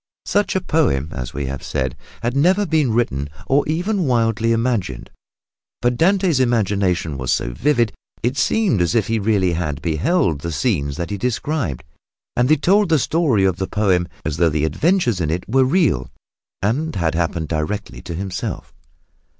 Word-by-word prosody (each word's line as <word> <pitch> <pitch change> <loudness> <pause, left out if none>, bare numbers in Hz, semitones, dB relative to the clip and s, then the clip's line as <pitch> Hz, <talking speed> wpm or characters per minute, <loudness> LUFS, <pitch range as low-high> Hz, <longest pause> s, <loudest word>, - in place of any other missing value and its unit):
Such 205 -1 +1
a 190 - +1
poem, 130 - +1
as 60 -2 -5
we 70 0 -4
have 65 0 -5
said, 65 -1 -2 0.3
had 120 +2 -1
never 185 +8 +3
been 155 -7 +1
written 75 - 0 0.2
or 140 +2 +3
even 180 +4 0
wildly 115 -2 +1
imagined, 115 - -1 0.7
but 120 0 +1
Dante's 180 0 +2
imagination 100 - +1
was 65 -1 -1
so - - 0
vivid 120 - +2 0.3
that 120 - +3
it 130 - -9
seemed 195 - +2
as 85 -1 +1
if 110 -4 +3
he 115 0 0
really 100 -4 +1
had 75 -5 -2
beheld 85 - 0
the 85 - -4
scenes 70 -1 -1
that 85 +3 -4
he 100 - -3
described. 125 - -2 0.5
And 125 +2 +2
he 155 - +5
told 195 +6 +3
the 160 - +4
story 140 - +2
of 95 -2 +1
the 95 - -2
poem 95 -5 +1 0.2
as 75 0 -2
though 85 -1 +4
the 75 0 0
adventures 120 - +1
in 75 - 0
it 85 +3 -2
were 130 +3 +3
real 130 - +1 0.5
and 135 +9 0
had 85 -4 0
happened 80 -1 -1
directly 75 -4 -3
to 85 - -6
himself. 95 +1 -5
105 Hz, 175 wpm, -20 LUFS, -, 0.7 s, he